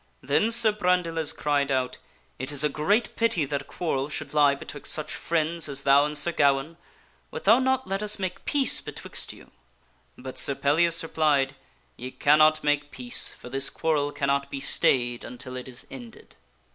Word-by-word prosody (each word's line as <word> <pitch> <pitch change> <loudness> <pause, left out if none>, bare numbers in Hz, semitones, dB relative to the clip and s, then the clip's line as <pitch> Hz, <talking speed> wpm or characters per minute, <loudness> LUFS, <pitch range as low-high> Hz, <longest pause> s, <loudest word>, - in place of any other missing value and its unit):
Then 225 - +1
Sir 230 -1 +6
Brandiles 180 -6 0
cried 145 -2 0
out, 130 -2 -1 0.2
" - - -38
It 130 +3 -2
is 145 0 +2
a 150 - +2
great 195 - 0
pity 225 -10 +1
that 140 0 -3
a - - -14
quarrel 140 -5 -3
should 155 - -6
lie 145 -2 +4
betwixt 145 0 -8
such 155 0 -2
friends 165 -1 -1
as 135 -1 +1
thou 140 +1 +5
and 150 0 -2
Sir 170 +4 0
Gawaine. 140 +1 +1 0.5
Wilt - - -7
thou 225 +5 +6
not 260 0 0
let 195 +1 -2
us 210 0 0
make 185 -2 -5
peace 280 -3 +1
betwixt - - -6
you? - - -16 0.3
" - - -38 0.3
But 130 0 -6
Sir 140 - +2
Pellias 165 +5 +2
replied, 145 -4 +1 0.2
" - - -38
Ye 125 +1 -6
cannot 155 +3 +3
make 145 0 0
peace, 125 -3 0
for 125 - -12
this 135 +1 +1
quarrel 150 -3 -1
cannot 140 -1 -1
be 140 - -5
stayed 120 -2 +1
until 130 +1 -8
it 125 0 -6
is 125 0 -5
ended." 120 -4 -12
150 Hz, 190 wpm, -26 LUFS, 135-170 Hz, 0.5 s, Sir